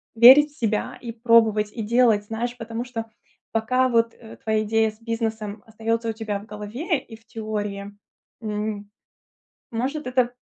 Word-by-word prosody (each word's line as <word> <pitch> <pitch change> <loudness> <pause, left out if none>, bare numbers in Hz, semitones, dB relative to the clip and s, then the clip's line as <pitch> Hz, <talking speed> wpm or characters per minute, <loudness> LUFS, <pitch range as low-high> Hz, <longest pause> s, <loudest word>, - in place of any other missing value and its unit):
верить 265 +6 +9
в 295 - -24
себя 220 -3 -1
и 235 -2 -5
пробовать, 225 -2 +4
и 230 - -5
делать. 225 -2 +3
Знаешь, 240 +3 -3
потому 230 +1 -4
что 230 -3 -5 0.5
пока 255 +4 +2
вот, 230 -1 +2
э, 225 -2 -13
твоя 220 -1 0
идея 220 +1 +2
с 215 - -23
бизнесом 225 -2 -3
остаётся 225 +1 -2
у - - -1
тебя 215 -2 -3
в 205 - -12
голове 235 - -3
и 225 - -12
в 225 0 -21
теории, 205 -3 -4 0.5
м, 210 -1 -3 0.8
может 265 +6 -2
это 250 -1 +2
225 Hz, 160 wpm, -24 LUFS, 215-240 Hz, 0.8 s, верить